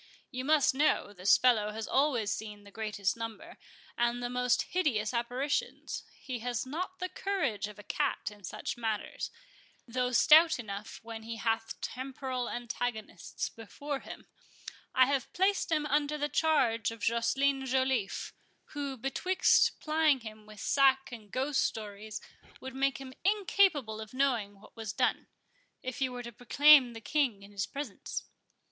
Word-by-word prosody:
You 255 0 -4
must 300 -2 +4
know, 270 -7 +2
this 185 0 +4
fellow 225 -5 +3
has 220 0 -5
always 260 -7 +2
seen 210 -1 -5
the 200 - -14
greatest 205 -3 -1
number, 230 +9 -7 0.4
and 240 +1 0
the 245 - -2
most 250 0 +2
hideous 250 -12 +1
apparitions; 245 +5 -2 0.2
he 255 -3 -5
has 245 +1 -2
not 360 +7 -4
the 365 - -2
courage 355 - -1
of 210 0 -11
a 205 - -11
cat - - -1
in 205 -1 -16
such 180 - -4
matters, 220 -3 -3 0.6
though 250 +1 -1
stout 315 +6 +7
enough 210 -3 -7
when 225 -1 -7
he 225 +1 -6
hath 225 0 -1
temporal 260 -1 -4
antagonists 240 -2 -4
before 275 +6 -6
him. - - -10 0.7
I 255 - +7
have 275 -1 -1
placed 380 -1 +1
him 305 -2 +2
under 295 0 +1
the 295 0 -1
charge 270 -10 +2
of 230 0 -8
Joceline 265 +4 +1
Joliffe, 260 -5 0 0.4
who, 280 -2 -3
betwixt 365 +10 +2
plying 305 -3 +2
him 215 -1 -10
with 215 -1 -12
sack 270 +2 +3
and 220 -4 -9
ghost 270 +5 +1
stories, 210 0 -4 0.4
would 260 0 -7
make 275 +1 +1
him 265 -1 -9
incapable 370 - +2
of 220 +3 -9
knowing 235 -7 0
what 215 - -17
was 220 -3 -5
done, - - 0 0.6
if 255 +1 -5
you 260 -1 +1
were 245 0 -6
to 235 - -7
proclaim 260 +2 +6
the 225 - -9
King 245 -7 0
in 200 - -13
his 200 -2 -2
presence." 280 -7 -5
250 Hz, 155 wpm, -31 LUFS, 220-280 Hz, 0.7 s, stout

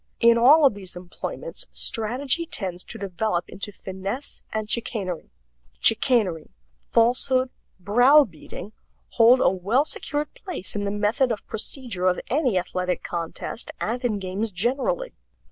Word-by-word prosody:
In 235 0 +6
all 280 +6 +7
of 270 - +5
these 190 -3 -9
employments 180 - -6
strategy 260 +9 0
tends 185 - -4
to - - -7
develop 195 -1 -2
into 200 +1 -7
finesse 195 +7 -6
and 215 -1 -2
chicanery. 210 - -2 0.5
Chicanery, 220 - +2 0.4
falsehood, 255 +2 +3 0.3
browbeating, 220 - +3 0.4
hold 240 +2 +6
a - - +5
well 200 +10 +1
secured 295 -1 -2
place 370 - -6
in 205 0 -1
the - - 0
method 210 +6 +1
of 215 - -4
procedure 220 -4 -3
of 180 - +2
any 260 -7 +2
athletic 180 0 -2
contest 170 +6 -5
and 240 +4 -2
in 225 -4 +1
games 195 +3 -3
generally. 280 - -1
220 Hz, 130 wpm, -24 LUFS, 190-255 Hz, 0.5 s, all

